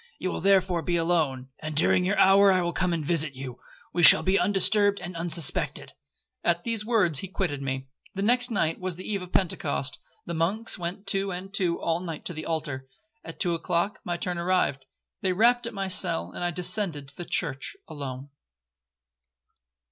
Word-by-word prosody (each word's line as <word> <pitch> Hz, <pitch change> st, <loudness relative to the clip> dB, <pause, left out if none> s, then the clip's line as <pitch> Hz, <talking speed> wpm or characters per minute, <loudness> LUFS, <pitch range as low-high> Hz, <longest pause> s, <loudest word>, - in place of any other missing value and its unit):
You 185 Hz, -, -3 dB
will -, -, -4 dB
therefore 190 Hz, -2 st, +3 dB
be 175 Hz, +3 st, -1 dB
alone, 160 Hz, -7 st, 0 dB
and 155 Hz, -1 st, -6 dB
during 175 Hz, +4 st, +3 dB
your 200 Hz, +3 st, 0 dB
hour 195 Hz, +1 st, +6 dB
I 185 Hz, -1 st, +2 dB
will 175 Hz, 0 st, -2 dB
come 185 Hz, -2 st, 0 dB
and 165 Hz, -3 st, -2 dB
visit 155 Hz, -3 st, +1 dB
you,—we 130 Hz, +6 st, -7 dB
shall 160 Hz, -, +9 dB
be 190 Hz, +1 st, +2 dB
undisturbed 205 Hz, 0 st, +3 dB
and 175 Hz, 0 st, -7 dB
unsuspected.' 165 Hz, -2 st, +1 dB, 0.5 s
At 175 Hz, 0 st, +1 dB
these 225 Hz, -2 st, -1 dB
words 205 Hz, -, +2 dB
he 195 Hz, -, -5 dB
quitted 175 Hz, -7 st, -3 dB
me. 135 Hz, -1 st, -3 dB, 0.3 s
The 195 Hz, -, -2 dB
next 245 Hz, +3 st, +3 dB
night 165 Hz, -8 st, 0 dB
was 185 Hz, -2 st, -3 dB
the 185 Hz, -, -8 dB
eve 200 Hz, -3 st, -2 dB
of 180 Hz, 0 st, -9 dB
Pentecost, 150 Hz, -7 st, -1 dB, 0.3 s
the 170 Hz, -, -4 dB
monks 190 Hz, +9 st, -1 dB
went 180 Hz, +4 st, -5 dB
two 195 Hz, 0 st, 0 dB
and 185 Hz, +2 st, -6 dB
two 180 Hz, -5 st, 0 dB
all 165 Hz, 0 st, 0 dB
night 165 Hz, -4 st, -7 dB
to 175 Hz, -, -4 dB
the 155 Hz, 0 st, -6 dB
altar,—at 160 Hz, +6 st, -6 dB
two 175 Hz, -, +1 dB
o'clock 170 Hz, +4 st, -1 dB
my 175 Hz, -1 st, -3 dB
turn 175 Hz, 0 st, -3 dB
arrived. 170 Hz, -7 st, 0 dB, 0.4 s
They 190 Hz, -3 st, +1 dB
rapped 235 Hz, +4 st, +3 dB
at 235 Hz, -, -7 dB
my 195 Hz, -1 st, -2 dB
cell, 85 Hz, -, +1 dB
and -, -, -5 dB
I 175 Hz, -, +1 dB
descended 175 Hz, -4 st, -3 dB
to 145 Hz, -, -15 dB
the 175 Hz, -, -5 dB
church 150 Hz, -, -2 dB
alone.' 135 Hz, -2 st, -7 dB
175 Hz, 185 wpm, -26 LUFS, 155-195 Hz, 0.5 s, shall